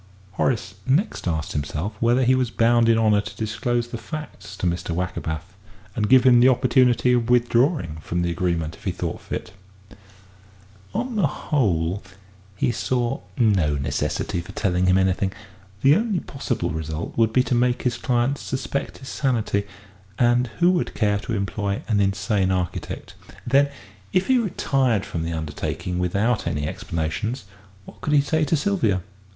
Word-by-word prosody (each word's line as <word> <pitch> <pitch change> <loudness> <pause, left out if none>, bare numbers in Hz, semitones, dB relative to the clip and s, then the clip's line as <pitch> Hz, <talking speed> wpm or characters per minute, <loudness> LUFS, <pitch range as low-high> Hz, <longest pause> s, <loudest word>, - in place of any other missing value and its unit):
Horace 95 -2 -1
next 145 - +1
asked 80 -3 -1
himself 75 +7 -3
whether 120 +3 +3
he 130 +1 +4
was 130 -2 +1
bound 115 0 +3
in 115 - +5
honour 105 -2 +3
to - - -9
disclose 120 +2 -1
the 120 - -5
facts 155 +6 -8
to - - -3
Mr. 85 -1 -1
Wackerbath, 90 -1 -4 0.4
and 105 -1 0
give 130 -1 +7
him 125 -2 +6
the 125 +2 +7
opportunity 125 -1 +3
of 120 -1 +1
withdrawing 120 - +2
from 85 +2 -2
the 85 - 0
agreement 85 -2 -1
if - - -16
he - - +1
thought - - -4
fit. - - -6 1.4
On 240 +2 -2
the 185 -7 +3
whole, 95 - 0 0.5
he 110 - +1
saw 125 +2 -1 0.2
no 95 - +3
necessity 70 +4 -2
for 85 - -11
telling 90 -2 +1
him 90 0 +5
anything; 95 0 +1 0.5
the 140 +2 +7
only 215 -2 +1
possible 135 - -3
result 80 +1 -4
would 115 -1 +3
be 125 +2 +3
to 130 - -2
make 125 0 +2
his 125 -2 0
client 125 +3 +1
suspect 135 +1 -3
his 135 - -10
sanity; 110 -7 0 0.5
and 120 +1 +3
who 175 +1 +5
would 180 -2 -1
care 105 -2 +1
to 115 +3 -5
employ 100 0 -2
an 105 -3 +2
insane 100 0 +1
architect? 90 -2 -3 0.3
Then, 140 +3 +4 0.4
if 185 +1 +3
he 260 -1 +4
retired 135 - +1
from 80 - -4
the 85 +1 -3
undertaking 80 +3 -3
without 100 +5 0
any 75 -4 -1
explanations, 85 +13 -3 0.4
what - - -14
could 150 - -1
he 145 - +6
say 155 +2 0
to 160 +3 +1
Sylvia? 140 - +1
115 Hz, 165 wpm, -23 LUFS, 90-130 Hz, 1.4 s, give